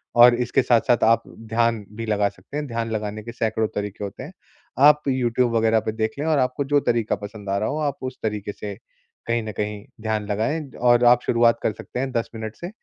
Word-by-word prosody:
और 120 Hz, 0 st, +8 dB
इसके 125 Hz, +2 st, +2 dB
साथ-साथ 120 Hz, 0 st, +3 dB
आप 115 Hz, +1 st, +4 dB
ध्यान 115 Hz, -1 st, -1 dB
भी 115 Hz, -, -4 dB
लगा 105 Hz, -2 st, +1 dB
सकते 105 Hz, +7 st, -10 dB
हैं। 150 Hz, -1 st, -3 dB
ध्यान 115 Hz, -2 st, -3 dB
लगाने 105 Hz, -1 st, -3 dB
के 115 Hz, -, -7 dB
सैकड़ों 110 Hz, -1 st, -1 dB
तरीके 105 Hz, 0 st, -4 dB
होते 100 Hz, +5 st, -6 dB
हैं। 150 Hz, -, -9 dB, 0.6 s
आप 150 Hz, 0 st, +6 dB
यूट्यूब 125 Hz, -2 st, +1 dB
वगैरह 110 Hz, 0 st, +3 dB
पे -, -, +2 dB
देखें 110 Hz, +6 st, -2 dB
और 155 Hz, -2 st, +2 dB
आपको 130 Hz, +2 st, 0 dB
जो 145 Hz, -, +6 dB
तरीका 115 Hz, -2 st, 0 dB
पसंद 100 Hz, -1 st, -9 dB
आ 100 Hz, -, +1 dB
रहा 110 Hz, -, -1 dB
हो 145 Hz, -, -2 dB
आप 140 Hz, -, -8 dB
उस -, -, -23 dB
तरीके 105 Hz, -2 st, -2 dB
से 100 Hz, -1 st, -6 dB, 0.5 s
कहीं 115 Hz, 0 st, +1 dB
न 110 Hz, -, -5 dB
कहीं 105 Hz, 0 st, -3 dB, 0.2 s
ध्यान 110 Hz, -1 st, -1 dB
लगाएँ। 140 Hz, +9 st, -1 dB
और 120 Hz, 0 st, +5 dB
आप 120 Hz, 0 st, +6 dB
शुरुआत 115 Hz, 0 st, +4 dB
कर -, -, +2 dB
सकते 125 Hz, -, -7 dB
हैं 135 Hz, 0 st, -2 dB
10 115 Hz, -2 st, -1 dB
मिनट 110 Hz, -1 st, -6 dB
से, 175 Hz, -, -6 dB
115 Hz, 220 wpm, -23 LUFS, 110-125 Hz, 0.6 s, और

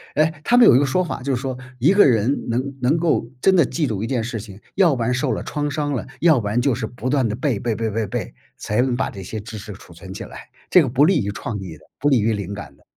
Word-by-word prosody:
诶， 155 Hz, +2 st, +2 dB
他 240 Hz, -, +2 dB
们 245 Hz, -, +8 dB
有 -, -, +7 dB
一 -, -, +6 dB
个 145 Hz, -, +2 dB
说 180 Hz, +7 st, +1 dB
法， 170 Hz, -, -5 dB
就 135 Hz, 0 st, -1 dB
是 125 Hz, -, -4 dB
说： 130 Hz, -2 st, -4 dB, 0.2 s
“一 150 Hz, +10 st, +4 dB
个 205 Hz, -, +6 dB
人 120 Hz, +1 st, +1 dB
能 130 Hz, +4 st, -2 dB
能 130 Hz, +6 st, +2 dB
够 165 Hz, -7 st, +1 dB
真 190 Hz, -, +4 dB
的 170 Hz, -5 st, +5 dB
记 155 Hz, +1 st, -1 dB
住 105 Hz, -4 st, -3 dB
一 -, -, -2 dB
件 120 Hz, -2 st, -1 dB
事 115 Hz, 0 st, -4 dB
情， 100 Hz, -2 st, -11 dB, 0.2 s
要 175 Hz, -7 st, +4 dB
不 120 Hz, -, -4 dB
然 120 Hz, +2 st, +1 dB
受 130 Hz, -, 0 dB
了 -, -, -2 dB
创 145 Hz, -1 st, -3 dB
伤 145 Hz, 0 st, -2 dB
了， 125 Hz, -, -3 dB, 0.2 s
要 160 Hz, -5 st, +5 dB
不 105 Hz, -, -4 dB
然 110 Hz, +4 st, +1 dB
就 130 Hz, -1 st, +1 dB
是 125 Hz, -, -3 dB
不 125 Hz, +3 st, -5 dB
断 135 Hz, -3 st, +2 dB
地 105 Hz, -, -2 dB
背 125 Hz, -3 st, -1 dB
背 115 Hz, 0 st, -1 dB
背 115 Hz, 0 st, -2 dB
背 110 Hz, +1 st, -1 dB
背， -, -, -5 dB, 0.2 s
才 105 Hz, +3 st, 0 dB
能 125 Hz, -1 st, 0 dB
把 130 Hz, -, -1 dB
这 95 Hz, -, -9 dB
些 110 Hz, +4 st, -6 dB
知 110 Hz, +1 st, -8 dB
识 105 Hz, 0 st, -8 dB
储 90 Hz, -2 st, -15 dB
存 95 Hz, +3 st, -10 dB
起 -, -, -7 dB
来。 -, -, -10 dB, 0.3 s
“这 180 Hz, -, +7 dB
个 145 Hz, -, 0 dB
不 135 Hz, +4 st, +4 dB
利 165 Hz, -, +3 dB
于 100 Hz, -, -2 dB
创 105 Hz, +1 st, -5 dB
意 90 Hz, -5 st, -8 dB
的、 80 Hz, -, -22 dB
不 145 Hz, -, +2 dB
利 135 Hz, -4 st, +4 dB
于 110 Hz, +1 st, +1 dB
灵 100 Hz, -2 st, -4 dB
感 100 Hz, 0 st, -9 dB
的。 -, -, -28 dB
125 Hz, 330 characters per minute, -21 LUFS, 110-145 Hz, 0.3 s, 们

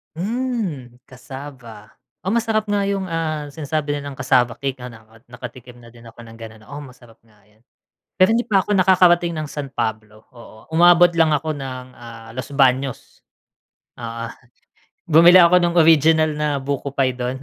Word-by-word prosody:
Hmm, 190 Hz, -, -4 dB
cassava. 125 Hz, -4 st, -11 dB, 0.3 s
Oh, -, -, -11 dB
masarap 220 Hz, -2 st, 0 dB
nga 205 Hz, -1 st, 0 dB
yung, 195 Hz, -1 st, -2 dB
ah, 155 Hz, -3 st, -3 dB
sinasabi 145 Hz, 0 st, -3 dB
nilang 145 Hz, 0 st, -6 dB
cassava 125 Hz, -2 st, +1 dB
cake, 135 Hz, -1 st, -3 dB
ah, 125 Hz, -, -8 dB
naka 115 Hz, +1 st, -18 dB
nakatikim 125 Hz, 0 st, -11 dB
na 120 Hz, -, -16 dB
din 115 Hz, 0 st, -17 dB
ako 115 Hz, +1 st, -15 dB
ng 115 Hz, -, -13 dB
ganun, 110 Hz, -1 st, -11 dB
oo 145 Hz, -, -9 dB
masarap 125 Hz, -3 st, -16 dB
nga 110 Hz, -2 st, -27 dB
yun. 110 Hz, +2 st, -31 dB, 0.6 s
Pero 185 Hz, -, +6 dB
hindi 240 Hz, -, 0 dB
pa 200 Hz, -4 st, +2 dB
ako 205 Hz, +2 st, -1 dB
nakakarating 175 Hz, -2 st, +4 dB
ng 155 Hz, -2 st, -5 dB
San 140 Hz, -2 st, -7 dB
Pablo, 110 Hz, -2 st, -5 dB
oo. 115 Hz, -1 st, -16 dB
Umabot 175 Hz, +2 st, +5 dB
lang 160 Hz, -2 st, +3 dB
ako 150 Hz, +1 st, -1 dB
ng, 130 Hz, -2 st, -7 dB
ah, 115 Hz, -1 st, -12 dB
Los 130 Hz, -, -6 dB
Baños. 135 Hz, -1 st, 0 dB, 0.8 s
Oo 115 Hz, 0 st, -6 dB, 0.9 s
bumili 170 Hz, +3 st, +7 dB
ako 175 Hz, +2 st, +5 dB
nung 175 Hz, -1 st, 0 dB
original 160 Hz, -1 st, +4 dB
na 150 Hz, 0 st, -1 dB
buko 140 Hz, 0 st, -4 dB
pie 135 Hz, -2 st, +1 dB
dun. 125 Hz, +2 st, -5 dB
140 Hz, 165 wpm, -20 LUFS, 120-170 Hz, 0.9 s, bumili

